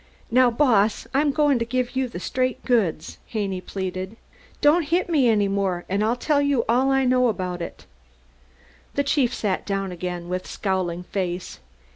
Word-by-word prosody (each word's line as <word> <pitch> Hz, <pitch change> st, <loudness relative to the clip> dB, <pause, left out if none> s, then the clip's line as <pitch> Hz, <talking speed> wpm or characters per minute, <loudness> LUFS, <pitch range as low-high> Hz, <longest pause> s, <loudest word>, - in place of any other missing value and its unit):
"Now, 250 Hz, +1 st, +5 dB
Boss, 230 Hz, -5 st, +2 dB
I'm 285 Hz, +2 st, +3 dB
goin' 290 Hz, -3 st, +2 dB
to -, -, +1 dB
give 250 Hz, +2 st, -2 dB
you 260 Hz, 0 st, +1 dB
the 230 Hz, -, -7 dB
straight 255 Hz, +6 st, -2 dB
goods," 195 Hz, -11 st, 0 dB
Haney 195 Hz, -4 st, -3 dB
pleaded. 190 Hz, +2 st, -5 dB, 0.4 s
"Don't 300 Hz, +4 st, +5 dB
hit 350 Hz, +2 st, +1 dB
me 275 Hz, -7 st, +4 dB
any 210 Hz, -2 st, +3 dB
more 195 Hz, -3 st, -1 dB
an' 195 Hz, +2 st, 0 dB
I'll 220 Hz, +3 st, +2 dB
tell 285 Hz, +3 st, +1 dB
you 285 Hz, -4 st, +1 dB
all 255 Hz, +4 st, +3 dB
I 270 Hz, 0 st, +2 dB
know 250 Hz, 0 st, +3 dB
about 180 Hz, -5 st, -2 dB
it." 170 Hz, -, -7 dB, 1.1 s
The 280 Hz, -, +2 dB
chief 280 Hz, -3 st, +2 dB
sat 205 Hz, -6 st, -1 dB
down 195 Hz, -2 st, -2 dB
again 175 Hz, 0 st, -5 dB
with 180 Hz, +1 st, -3 dB
scowling 185 Hz, -3 st, -2 dB
face. 180 Hz, -1 st, -4 dB
220 Hz, 170 wpm, -23 LUFS, 185-255 Hz, 1.1 s, Now